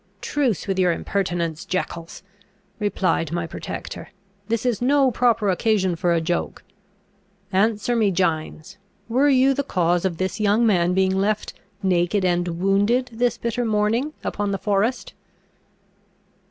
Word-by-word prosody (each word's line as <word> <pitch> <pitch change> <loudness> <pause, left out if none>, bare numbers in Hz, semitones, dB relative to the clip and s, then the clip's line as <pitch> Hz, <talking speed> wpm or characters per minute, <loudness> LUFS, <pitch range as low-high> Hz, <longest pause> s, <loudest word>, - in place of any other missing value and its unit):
"Truce 265 - -1
with 195 -2 -1
your 180 -1 +4
impertinence, 170 -3 -2
Jeckols!" 170 -2 -4 0.6
replied 185 -6 0
my 170 -1 -2
protector: 165 - -7 0.4
"this 230 +1 -1
is 240 -4 0
no 270 +1 +3
proper 230 -2 +2
occasion 190 -2 +1
for 175 +1 0
a 170 - +3
joke. 170 +2 -3 0.9
Answer 210 +4 +1
me, 220 -3 +3
Gines, 165 -2 -2 0.3
were 260 +5 +3
you 270 0 +4
the 280 - -1
cause 175 -9 0
of 180 -4 -1
this 190 +2 -2
young 215 +2 +3
man 180 -4 +2
being 190 0 +2
left 205 +2 -1 0.3
naked 185 +1 +1
and 175 0 +1
wounded 205 +7 +2
this 240 +1 0
bitter 235 +1 -2
morning 225 +6 0
upon 205 -1 -2
the 195 - -1
forest?" 205 +5 -1
200 Hz, 140 wpm, -22 LUFS, 175-230 Hz, 0.9 s, your